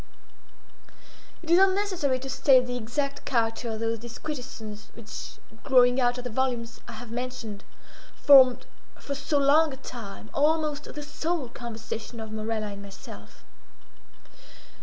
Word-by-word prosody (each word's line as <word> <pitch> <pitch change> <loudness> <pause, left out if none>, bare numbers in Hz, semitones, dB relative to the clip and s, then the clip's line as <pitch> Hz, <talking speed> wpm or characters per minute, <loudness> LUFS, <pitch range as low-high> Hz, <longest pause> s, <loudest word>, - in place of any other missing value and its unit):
It 330 - -4
is 345 - +7
unnecessary 380 -8 +2
to 270 - -6
state 260 -2 +5
the 245 0 -4
exact 275 +5 -3
character 230 -1 0
of 220 -1 -4
those 225 0 -1
disquisitions 235 -3 -7
which, 230 -2 -8 0.3
growing 250 -2 +5
out 245 0 +2
of 250 - -5
the 250 - -5
volumes 240 -1 -1
I 235 - -7
have 225 +1 -9
mentioned, 235 -4 -5 0.5
formed, 260 -3 +7 0.3
for 280 - -5
so 285 +2 -1
long 290 +3 +5
a - - -8
time, 235 -7 -9
almost 300 0 +1
the 295 - -7
sole 310 -2 -2
conversation 230 -1 -7
of 220 -1 -7
Morella 215 0 -2
and 200 0 -8
myself. 200 -1 -12
250 Hz, 140 wpm, -27 LUFS, 225-285 Hz, 0.5 s, is